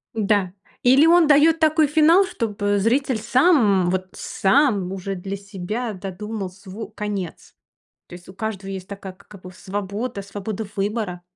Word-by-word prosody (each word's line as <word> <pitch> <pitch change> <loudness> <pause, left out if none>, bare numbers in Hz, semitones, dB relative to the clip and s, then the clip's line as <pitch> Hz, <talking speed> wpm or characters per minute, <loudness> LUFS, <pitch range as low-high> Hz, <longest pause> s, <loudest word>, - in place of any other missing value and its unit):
Н-да, 205 -4 +1 0.3
или 265 +5 +6
он 340 -1 +5
даёт 305 +2 +5
такой 310 -1 +3
финал, 320 +6 +5
чтобы 205 - -1
зритель 250 +4 +1
сам, 220 - +3
вот 185 0 -2
сам 200 -4 +1
уже 195 +1 -4
для 195 +2 -5
себя 200 +4 -5
додумал 195 +1 -6
сво 195 +3 -9
конец, 205 -5 -6 0.5
то - - -14
есть 175 0 -12
у 185 - -11
каждого 195 -1 -5
есть 190 -1 -6
такая 195 -1 -8
как 200 +1 -16
бы 185 - -10
свобода 200 +4 -5
свобода 205 +2 -6
выбора. 200 -3 -2
205 Hz, 150 wpm, -22 LUFS, 190-245 Hz, 0.5 s, или